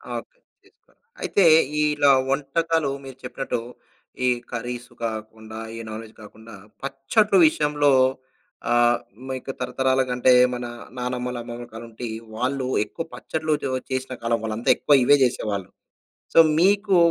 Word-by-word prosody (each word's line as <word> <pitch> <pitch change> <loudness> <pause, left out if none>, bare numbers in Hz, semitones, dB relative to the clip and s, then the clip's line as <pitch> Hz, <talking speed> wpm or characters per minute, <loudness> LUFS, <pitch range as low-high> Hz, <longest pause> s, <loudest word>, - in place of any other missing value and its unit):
Okay. - - -8 0.3
చేస్కోవాలి. - - -30 0.2
అయితే 200 - +2 0.4
ఇలా 150 -2 +4 0.2
వంటకాలు 150 +2 0
మీరు 135 -1 -10
చెప్పినట్టు 125 0 -3 0.7
ఈ - - +3 0.2
కర్రీస్ 120 +1 -5
కాకుండా, 110 0 -6 0.2
ఈ - - -7
నాన్ 110 +1 -6
వేజ్ 110 -1 -14
కాకుండా, 110 +1 -13 0.3
పచ్చడ్లు 140 +10 +1
విషయంలో 150 -1 +2 0.8
ఆహ్, 120 0 +4 0.3
మీకు 130 0 -4
తరతరాలుగా 130 +1 0
అంటే, 125 +1 +4 0.2
మన 120 0 -4 0.3
నానమ్మలు 125 0 -3
అమ్మమ్మలు 120 0 -8
కాలం 115 +1 -8
నుండి 115 +1 -7 0.3
వాళ్ళు 130 +3 -1 0.2
ఎక్కువ 105 +9 -6
పచ్చడ్లు 160 -1 -3 0.2
ఉ - - -1
చేసిన 130 0 -2
కాలం 115 0 +1
వాళ్ళు 110 -1 -2
అంతా 115 - -2
ఎక్కువ 145 - +3
ఇవే 145 +3 +6
చేసేవాళ్ళు. 105 -6 -1 0.6
సో, - - +4 0.2
మీకు 200 +1 +3
125 Hz, 135 wpm, -23 LUFS, 115-145 Hz, 0.8 s, ఇవే